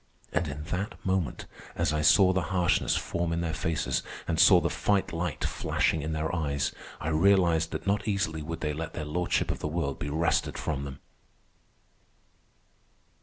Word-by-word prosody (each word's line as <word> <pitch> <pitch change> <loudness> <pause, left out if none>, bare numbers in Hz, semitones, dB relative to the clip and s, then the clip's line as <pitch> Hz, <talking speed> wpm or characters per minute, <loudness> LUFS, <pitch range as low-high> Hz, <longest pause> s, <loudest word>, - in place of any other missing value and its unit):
And 85 -1 +1
in 75 +1 -5
that 90 +5 -3
moment, 95 -8 -1 0.3
as 85 -3 +1
I 75 - 0
saw 95 +5 +6
the 95 - +1
harshness 90 -2 +2
form 85 -1 -2
in 85 0 -1
their 80 -2 -2
faces 85 -4 -1 0.3
and - - 0
saw - - +8
the - - 0
fight 100 -4 0
light 85 +1 -3
flashing 80 - 0
in 80 +2 -3
their 80 +2 -2
eyes, 70 -4 -1 0.3
I 80 - -3
realized 85 -1 +3
that - - -5
not 100 +2 0
easily 85 -6 -1
would 80 +2 -5
they 75 -1 -1
let 80 +1 -5
their 75 - -4
lordship 85 +4 0
of - - -5
the - - -3
world 75 -3 -2
be 75 - -3
wrested 80 +3 0
from 70 -2 -3
them. 70 0 -8
80 Hz, 175 wpm, -28 LUFS, 75-90 Hz, 0.3 s, saw